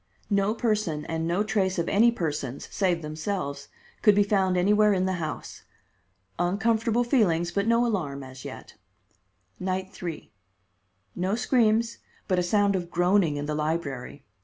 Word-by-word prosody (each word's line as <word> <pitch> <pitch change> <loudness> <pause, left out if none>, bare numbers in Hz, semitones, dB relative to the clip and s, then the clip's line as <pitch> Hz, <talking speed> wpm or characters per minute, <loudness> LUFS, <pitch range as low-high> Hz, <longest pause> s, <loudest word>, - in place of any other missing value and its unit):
No 200 +2 +2
person 215 -10 -1
and 165 0 -2
no 175 +5 +1
trace 195 -3 0
of 170 - -1
any 230 +4 +4
persons, 150 - -4
save 180 -4 0
themselves, 150 -2 -4 0.3
could 210 -2 +6
be 205 - +5
found 190 -3 +1
anywhere 210 +3 +4
in 185 -1 +1
the 185 -2 -1
house. 155 -1 -6 0.8
Uncomfortable 220 +5 +1
feelings, 175 -9 +2
but 200 +3 -1
no 230 +1 +3
alarm 150 - -2
as 130 0 -11
yet. - - -9 0.9
Night 185 +1 -2
3: 170 -3 -7 0.8
No 185 +3 0
screams, 235 -2 +2 0.3
but 185 -2 +2
a - - +2
sound 200 +2 +2
of 175 -2 -3
groaning 175 -3 +2
in 145 - -3
the 150 - -2
library. 150 -3 -3
185 Hz, 150 wpm, -26 LUFS, 160-210 Hz, 0.9 s, could